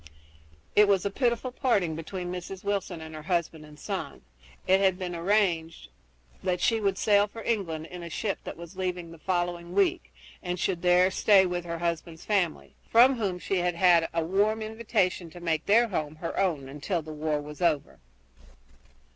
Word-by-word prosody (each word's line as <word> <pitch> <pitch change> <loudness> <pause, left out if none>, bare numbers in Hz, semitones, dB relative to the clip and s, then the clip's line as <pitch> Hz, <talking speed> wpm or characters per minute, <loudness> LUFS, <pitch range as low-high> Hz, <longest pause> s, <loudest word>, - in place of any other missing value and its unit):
It 210 0 +7
was 195 -2 +2
a 200 - 0
pitiful 245 +2 0
parting 205 - +1
between 175 +2 -5
Mrs. 180 +1 -7
Wilson 195 -4 -2
and 160 0 -9
her 155 - -7
husband 170 -1 -2
and 150 0 -15
son. - - -5 0.4
It 190 +1 +4
had 190 -2 +3
been 180 -2 -4
arranged 170 -3 0 0.5
that 180 -1 0
she 225 - +2
should 195 -3 0
sail 205 -1 +4
for 225 +2 -10
England 170 -9 -2
in 180 +1 -9
a 170 - -7
ship 200 +4 -2
that - - -7
was 170 +2 -10
leaving 180 -2 -3
in 165 - -13
the 165 - -12
following 175 -1 -2
week 200 -1 +1 0.3
and 180 0 -3
should 180 -2 -1
there 180 +1 +4
stay 195 0 +5
with 175 -1 -3
her 170 -1 -4
husband's 170 -1 -3
family, 190 -7 0 0.2
from 250 +3 +6
whom 195 -5 -1
she 190 +2 -2
had 175 -1 +3
a 165 -1 0
warm 210 +5 +1
invitation 210 -6 -1
to 175 - -11
make 165 -2 -1
their 230 +3 +5
home 155 -5 -3
her 165 +2 -5
own 165 -9 0
until 150 +5 -3
the 155 0 -8
war 150 0 -1
was 150 +3 -9
over. 160 -5 0
180 Hz, 185 wpm, -27 LUFS, 165-200 Hz, 0.5 s, It